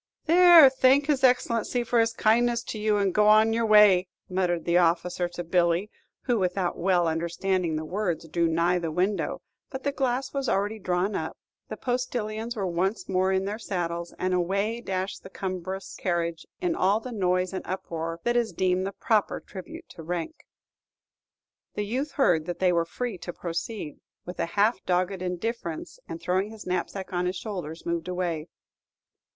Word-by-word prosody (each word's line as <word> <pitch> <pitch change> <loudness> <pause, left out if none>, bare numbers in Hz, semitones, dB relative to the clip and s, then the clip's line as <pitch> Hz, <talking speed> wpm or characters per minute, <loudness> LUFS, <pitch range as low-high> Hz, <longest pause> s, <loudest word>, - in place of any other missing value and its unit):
"There, 345 -2 +9
thank 265 +2 +4
his 285 -3 0
Excellency 245 -1 +2
for 235 0 +1
his 225 0 +3
kindness 235 +2 +2
to 220 - -6
you, 210 0 +2
and 200 -2 +1
go 210 0 +6
your 225 +1 +1
way," 205 -4 +6 0.2
muttered 180 -3 -1
the 175 +1 +4
officer 175 +1 +1
to 175 0 -6
Billy, 170 +3 +1 0.3
who, 245 -4 +1
without 180 -1 0
well 175 -1 +2
understanding 170 +1 -1
the 155 0 -3
words, 175 -2 -2
drew 170 +1 +1
nigh 170 +2 +2
the 165 -2 -3
window; 185 +5 -1 0.3
but 265 -2 -7
the 280 - 0
glass 265 -1 -1
was 275 -2 -1
already 205 +3 0
drawn 180 +2 0
up, - - -4 0.3
the - - -5
postilions 240 -2 -2
were 200 -3 -2
once 185 +3 -1
more 190 0 +1
in 190 0 +1
their 210 +2 -4
saddles, 170 -4 -3
and 185 0 -1
away 200 +6 0
dashed 190 0 -3
the - - -11
cumbrous 190 0 -5
carriage 170 -2 -2
in 355 -2 +1
all 200 - +2
the 250 +2 -8
noise 185 -3 0
and 190 - -3
uproar 165 -3 -4
that 240 0 +1
is 235 -3 +1
deemed 185 +2 +1
the - - -3
proper 215 0 0
tribute 325 - -10
to - - -11
rank. 175 - -5 1.3
The 205 - -2
youth 260 +7 -3
heard 170 - +2
that 175 -1 -3
they 180 -1 +2
were 170 -1 +2
free 225 +2 -4
to 175 - -6
proceed, 170 0 -5 0.3
with 180 - -8
a - - 0
half 205 0 +3
dogged 185 +1 0
indifference, 180 -1 -4
and 165 - -6
throwing 185 +4 0
his 220 -1 -11
knapsack 185 +1 -3
on 180 0 0
his 180 - -2
shoulders, 180 -5 -6
moved 170 0 -2
away. 175 -3 -2
190 Hz, 175 wpm, -26 LUFS, 175-225 Hz, 1.3 s, There